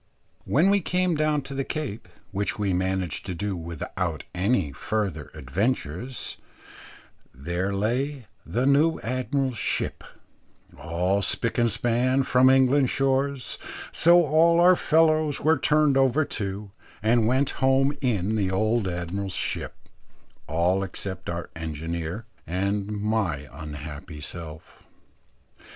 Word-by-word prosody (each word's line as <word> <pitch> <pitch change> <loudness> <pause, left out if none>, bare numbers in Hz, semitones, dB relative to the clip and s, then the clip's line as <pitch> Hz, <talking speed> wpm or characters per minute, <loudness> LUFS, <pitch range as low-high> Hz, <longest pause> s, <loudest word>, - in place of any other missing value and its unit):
When 170 +8 +3
we 200 0 +3
came 180 +1 +1
down 155 -2 +1
to 140 - -8
the 135 0 -1
Cape, 140 -8 -5 0.2
which 100 +4 -2
we 100 -3 0
managed 95 -2 -1
to 90 - -3
do 100 +2 -2
without 85 -2 -4
any 95 - +1
further 95 -1 -3
adventures, 100 - -3 1.0
there 85 +8 -2
lay 120 +7 -1 0.2
the 125 +3 -1
new 145 +4 +3
admiral's 130 0 -1
ship, - - -1 0.7
all 90 +4 0
spick 115 +4 0
and 120 0 +3
span 120 +4 +1
from 130 0 +5
England's 130 0 +4
shores, 135 -1 0 0.3
so 175 +1 +6
all 165 +3 +4
our 180 +1 +7
fellows 155 -3 +3
were 155 -1 +3
turned 150 -1 +3
over 135 +3 +3
to, 100 -3 -5 0.3
and 115 0 +3
went 130 +3 +2
home 135 +2 +3
in 110 -5 0
the 100 -3 +1
old 110 +2 +1
Admiral's 90 +2 -3
ship, - - -3 0.7
all 85 +5 +1
except 95 -1 -5
our 85 0 -5
engineer 80 +5 -4 0.2
and 100 +4 -1
my 105 -8 -1
unhappy 75 +1 -8
self. 80 0 -7
110 Hz, 125 wpm, -25 LUFS, 90-135 Hz, 1.0 s, our